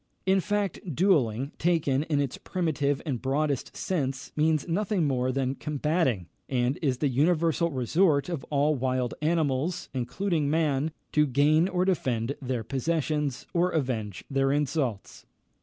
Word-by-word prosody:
In 190 +1 +4
fact, 205 0 -1 0.2
duelling, 140 - +2
taken 155 -5 +2
in 150 -2 0
its 140 -3 -2
primitive 145 -6 -1
and 130 -7 -2
broadest 140 0 -1
sense, 135 -7 -2
means 155 0 +2
nothing 185 0 0
more 130 -2 +1
than 130 0 0
combating, 150 - 0 0.2
and 125 +1 0
is 135 -6 +1
the 145 - +1
universal 165 +5 +2
resort 145 +3 +2
of 170 -6 -4
all 145 +1 +2
wild 130 -2 -1
animals, 155 +1 0
including 150 +4 -1
man, 155 -1 +1 0.2
to 150 0 +3
gain 150 +6 +3
or 180 -1 0
defend 130 -8 0
their 125 -3 -2
possessions, 150 +1 -1
or 175 +1 +2
avenge 125 - -2
their 135 -1 +1
insults. 140 -7 -2
145 Hz, 140 wpm, -27 LUFS, 130-165 Hz, 0.2 s, In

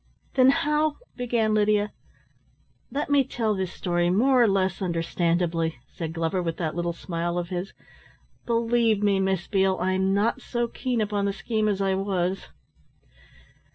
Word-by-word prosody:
"Then 260 -1 +6
how 300 +2 +1
" - - -41
began 235 -3 0
Lydia. 210 0 +2 1.0
"Let 290 +1 -2
me 285 -1 +5
tell 230 -4 -1
this 190 -2 -2
story 175 -2 0
more 250 +7 +4
or 235 - +6
less 190 -2 0
understandably," 170 -1 0 0.2
said 165 -2 -4
Glover 165 +2 -1
with 165 -2 -3
that 160 -3 -2
little 175 0 -1
smile 170 0 -3
of 175 -1 -3
his. 180 +1 -4 0.7
"Believe 230 -2 +2
me, 200 -2 +3
Miss 190 -2 0
Beale, 190 -2 +1
I'm 185 +1 +1
not 220 +6 +1
so 240 -1 -2
keen 245 -1 -2
upon 205 -1 0
the 200 - 0
scheme 215 0 -1
as 200 -2 0
I 195 -1 +1
was. 190 -1 -1
195 Hz, 155 wpm, -25 LUFS, 175-230 Hz, 1.0 s, Then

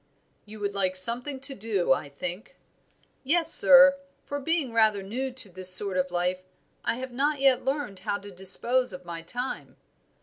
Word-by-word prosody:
"You 215 0 -13
would 200 0 -3
like 190 -2 -1
something 245 +8 -1
to 275 0 -4
do, 200 -6 -1
I 155 -5 -6
think." 175 +8 -8 0.7
"Yes, 325 +4 0
sir; 275 0 +7 0.3
for 285 - -6
being 290 -4 -3
rather 215 -3 +2
new 255 +7 -5
to 255 -4 -1
this 185 0 +4
sort 190 +1 +5
of 185 0 -2
life, 180 +1 -2 0.4
I - - -2
have 260 +1 -8
not 285 +4 -2
yet 270 -2 +2
learned 270 -8 -4
how 200 +2 -4
to 205 0 -13
dispose 200 +6 +2
of 180 0 -11
my 170 -1 -8
time." 245 +10 -7
220 Hz, 175 wpm, -25 LUFS, 185-265 Hz, 0.7 s, sir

